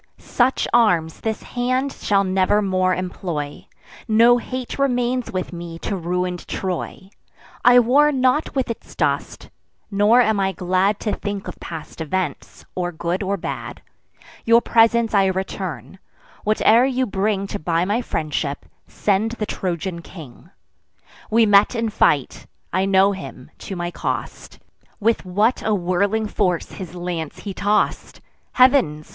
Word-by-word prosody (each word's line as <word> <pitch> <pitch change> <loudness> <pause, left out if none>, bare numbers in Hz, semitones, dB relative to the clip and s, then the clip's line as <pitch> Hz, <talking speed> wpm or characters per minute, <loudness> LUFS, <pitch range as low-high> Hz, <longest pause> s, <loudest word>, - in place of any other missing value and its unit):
Such 255 +1 0
arms 175 -9 +3
this 220 -1 -3
hand 255 +3 -1
shall 200 -1 +1
never 190 +2 +2
more 185 -1 +1
employ; 170 -5 -5 0.4
No 235 +2 +5
hate 255 +2 -6
remains 250 -2 0
with 185 -1 -4
me 170 -1 -7
to 200 - -4
ruin'd 180 0 -3
Troy. 190 +1 -5 0.5
I 245 0 +7
war 270 +5 +5
not 260 +3 +1
with 260 -3 0
its 230 - -10
dust; - - -2 0.4
nor 205 +4 +4
am 220 -4 +3
I 195 0 0
glad 185 +3 +1
To 210 - -1
think 205 -1 -4
of - - -8
past 165 0 -8
events, 160 -1 -4
or 175 -1 -2
good 170 +3 -3
or 200 0 -1
bad. - - -6 0.6
Your 230 +1 +5
presents 230 -1 +3
I 195 -2 +4
return: 190 -1 -4 0.5
whate'er 215 +2 +4
you 260 -1 +1
bring 200 -1 -1
To - - -5
buy 165 +2 0
my 210 +5 0
friendship, 150 - -3 0.2
send 210 +3 0
the 220 -3 -3
Trojan 175 -2 -4
king. 160 -3 -13 0.8
We 225 +1 +4
met 205 +3 +5
in 230 -1 -1
fight; 215 - +1 0.3
I 190 - +2
know 195 0 +4
him, 190 -9 -9
to 195 - -6
my 175 0 -3
cost: - - -5 0.4
With 225 -1 +1
what 210 +7 +1
a 215 -1 +1
whirling 200 +4 0
force 185 -5 -1
his 180 -2 -8
lance 175 -3 -4
he 200 - -5
toss'd! 205 +2 0 0.3
Heav'ns! 250 - +3
195 Hz, 145 wpm, -21 LUFS, 180-230 Hz, 0.8 s, I